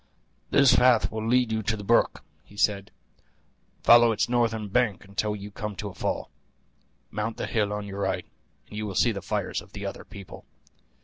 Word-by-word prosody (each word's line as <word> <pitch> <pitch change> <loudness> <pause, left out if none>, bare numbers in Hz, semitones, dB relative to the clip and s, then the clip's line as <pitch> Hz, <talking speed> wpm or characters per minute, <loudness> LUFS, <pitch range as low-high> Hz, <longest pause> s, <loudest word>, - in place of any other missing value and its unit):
"This 140 -2 +5
path 125 -3 +4
will 110 0 -4
lead 125 -1 +2
you 110 0 0
to 110 +1 -1
the 105 - -7
brook," 115 +4 +2 0.2
he 105 - -18
said; 100 -2 +1 0.9
"follow 120 0 +7
its 110 - 0
northern 115 -3 0
bank 105 -2 0
until 105 +2 -2
you 105 0 -8
come 105 0 -5
to 105 +1 -5
a - - -11
fall; - - -3 0.8
mount 105 +2 -3
the - - -3
hill 105 -2 0
on 105 0 -4
your 100 0 -7
right, - - -1 0.4
and - - -11
you 105 0 -3
will 100 - -6
see 120 - +3
the 100 -3 -5
fires - - -2
of - - -18
the - - -6
other - - -6
people. 100 -2 -11
105 Hz, 195 wpm, -26 LUFS, 100-115 Hz, 0.9 s, follow